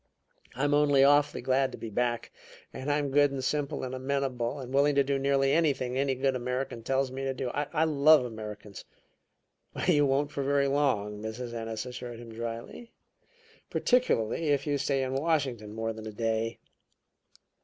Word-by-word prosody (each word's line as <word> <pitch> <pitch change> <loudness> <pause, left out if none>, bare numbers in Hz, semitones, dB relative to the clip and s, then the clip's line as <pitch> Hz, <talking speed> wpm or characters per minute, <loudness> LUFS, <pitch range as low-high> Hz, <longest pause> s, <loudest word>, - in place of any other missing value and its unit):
"I'm 145 +3 +1
only 145 -2 +4
awfully 145 +1 +3
glad 135 0 +2
to - - -7
be 115 - -7
back; 120 +1 -1 0.4
and 135 +3 -3
I'm 145 -1 0
good 145 +1 +5
and 135 -1 -4
simple 145 +1 -1
and 130 0 -4
amenable, 130 -1 -2
and 130 -1 -7
willing 140 +1 +3
to 140 - +5
do 135 0 0
nearly 135 0 +2
anything 140 -6 +1
any 135 0 +1
good 135 0 0
American 125 -1 -3
tells 135 +2 0
me 135 +1 -5
to 135 -1 -2
do. 125 -1 -3
I 150 +2 0
love 155 -2 +5
Americans." 105 -3 -8 1.0
"You 145 -5 +4
won't 140 +2 +1
for 140 - -3
very 140 0 +2
long," 115 -8 0
Mrs. 115 +2 -5
Ennis 115 0 -4
assured 125 -1 -7
him 115 -1 -10
dryly. 115 - -6 0.8
"Particularly 165 - +1
if 145 -2 +1
you 145 -2 0
stay 135 0 0
in 130 0 -3
Washington 135 -7 -1
more 115 +1 -3
than 110 0 -8
a - - -5
day." 115 +1 -1
135 Hz, 170 wpm, -29 LUFS, 120-145 Hz, 1.0 s, good